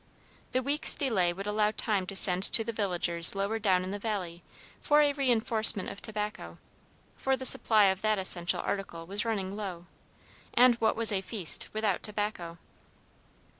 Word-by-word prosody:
The 255 Hz, +1 st, -2 dB
week's 285 Hz, +3 st, +2 dB
delay 200 Hz, -11 st, -1 dB
would 195 Hz, +3 st, -8 dB
allow 210 Hz, 0 st, -1 dB
time 205 Hz, -3 st, -3 dB
to 195 Hz, -, -7 dB
send 185 Hz, -1 st, +5 dB
to 225 Hz, -, +5 dB
the 230 Hz, -, -5 dB
villagers 175 Hz, -4 st, +4 dB
lower 200 Hz, +3 st, -3 dB
down 190 Hz, -4 st, 0 dB
in 185 Hz, -, -7 dB
the 205 Hz, -, -6 dB
valley 190 Hz, -6 st, -6 dB, 0.4 s
for 300 Hz, 0 st, +2 dB
a 290 Hz, -1 st, 0 dB
reinforcement 225 Hz, -6 st, +2 dB
of 200 Hz, -, -11 dB
tobacco, 210 Hz, -, -7 dB, 0.6 s
for 265 Hz, 0 st, -2 dB
the 260 Hz, -, -8 dB
supply 220 Hz, -4 st, +3 dB
of 190 Hz, 0 st, -1 dB
that 215 Hz, -1 st, 0 dB
essential 175 Hz, -2 st, 0 dB
article 180 Hz, -4 st, -6 dB
was 200 Hz, +5 st, -3 dB
running 200 Hz, -4 st, -4 dB
low, 185 Hz, -5 st, -8 dB, 0.7 s
and 250 Hz, 0 st, +5 dB
what 220 Hz, -1 st, -1 dB
was 225 Hz, -1 st, +3 dB
a 195 Hz, -2 st, -2 dB
feast 190 Hz, -3 st, 0 dB
without 215 Hz, -3 st, -3 dB
tobacco? 205 Hz, -5 st, -5 dB
205 Hz, 170 wpm, -27 LUFS, 185-220 Hz, 0.7 s, send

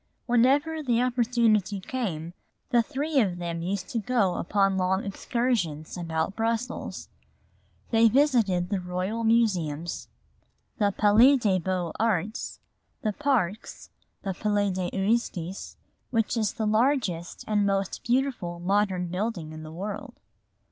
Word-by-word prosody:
Whenever 280 Hz, +7 st, +3 dB
the 240 Hz, -5 st, +1 dB
opportunity 235 Hz, -5 st, +2 dB
came, 185 Hz, -8 st, -4 dB, 0.4 s
the 240 Hz, -2 st, +5 dB
three 280 Hz, +5 st, -1 dB
of 190 Hz, -7 st, +1 dB
them 170 Hz, -1 st, -4 dB
used 185 Hz, +2 st, -3 dB
to 235 Hz, -, -1 dB
go 215 Hz, -4 st, +1 dB
upon 195 Hz, +2 st, +1 dB
long 190 Hz, +1 st, +1 dB
excursions 200 Hz, -7 st, -1 dB
about 165 Hz, +1 st, -2 dB
Brussels. 230 Hz, +2 st, -3 dB, 0.8 s
They 225 Hz, 0 st, +5 dB
visited 225 Hz, -10 st, +2 dB
the 200 Hz, -2 st, 0 dB
Royal 185 Hz, +5 st, -3 dB
Museums, 180 Hz, -9 st, +1 dB, 0.7 s
the 205 Hz, -2 st, +3 dB
Palais 220 Hz, +7 st, +5 dB
des 200 Hz, -6 st, +1 dB
Beaux 180 Hz, -2 st, -2 dB
Arts, 215 Hz, -1 st, -1 dB, 0.4 s
the 215 Hz, -2 st, 0 dB
parks, 230 Hz, -7 st, -1 dB, 0.3 s
the 195 Hz, -, -2 dB
Palais 205 Hz, 0 st, 0 dB
de 185 Hz, -1 st, -2 dB
Justice, 195 Hz, -3 st, -2 dB, 0.3 s
which 230 Hz, -2 st, 0 dB
is 215 Hz, -3 st, 0 dB
the 220 Hz, -, -2 dB
largest 215 Hz, -, 0 dB
and 210 Hz, -1 st, +2 dB
most 195 Hz, -1 st, -1 dB
beautiful 240 Hz, -9 st, -1 dB
modern 190 Hz, 0 st, +1 dB
building 180 Hz, -2 st, -3 dB
in 155 Hz, 0 st, -8 dB
the 155 Hz, 0 st, -9 dB
world. 210 Hz, -, -6 dB
205 Hz, 125 wpm, -27 LUFS, 180-235 Hz, 0.8 s, the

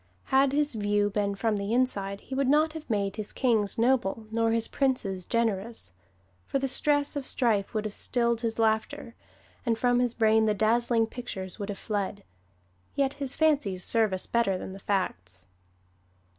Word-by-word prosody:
Had 270 Hz, 0 st, +5 dB
his 295 Hz, 0 st, +1 dB
view 205 Hz, -1 st, +1 dB
been 200 Hz, 0 st, -1 dB
from 215 Hz, +1 st, 0 dB
the 200 Hz, +2 st, -2 dB
inside 200 Hz, -6 st, 0 dB
he -, -, -9 dB
would 270 Hz, 0 st, +1 dB
not 305 Hz, +3 st, +3 dB
have 315 Hz, -3 st, -9 dB
made 200 Hz, -2 st, -1 dB
his 210 Hz, -1 st, -5 dB
kings 225 Hz, -5 st, +1 dB
noble 230 Hz, -3 st, +1 dB
nor 230 Hz, 0 st, +1 dB
his 230 Hz, 0 st, +1 dB
princes 205 Hz, -10 st, -1 dB
generous; 225 Hz, -, -1 dB, 0.5 s
for -, -, 0 dB
the 270 Hz, 0 st, -1 dB
stress 290 Hz, +2 st, +1 dB
of 285 Hz, -, -2 dB
strife 225 Hz, -6 st, 0 dB
would 215 Hz, 0 st, -1 dB
have 210 Hz, -, -4 dB
stilled 235 Hz, -1 st, 0 dB
his 225 Hz, -2 st, -2 dB
laughter, 225 Hz, +3 st, 0 dB, 0.5 s
and 230 Hz, -3 st, 0 dB
from 245 Hz, +1 st, +2 dB
his 245 Hz, -1 st, 0 dB
brain 220 Hz, -1 st, +3 dB
the 210 Hz, -, +2 dB
dazzling 230 Hz, +2 st, +2 dB
pictures 220 Hz, -5 st, -6 dB
would 200 Hz, 0 st, -4 dB
have 200 Hz, -, -4 dB
fled. 200 Hz, -1 st, -3 dB, 0.7 s
Yet 275 Hz, -1 st, +1 dB
his 275 Hz, -1 st, -1 dB
fancies 275 Hz, -, +1 dB
serve 225 Hz, -3 st, +2 dB
us 185 Hz, 0 st, -2 dB
better 225 Hz, -5 st, +1 dB
than 190 Hz, -, -7 dB
the 195 Hz, -, -9 dB
facts. 90 Hz, -, -3 dB
225 Hz, 175 wpm, -28 LUFS, 200-255 Hz, 0.7 s, Had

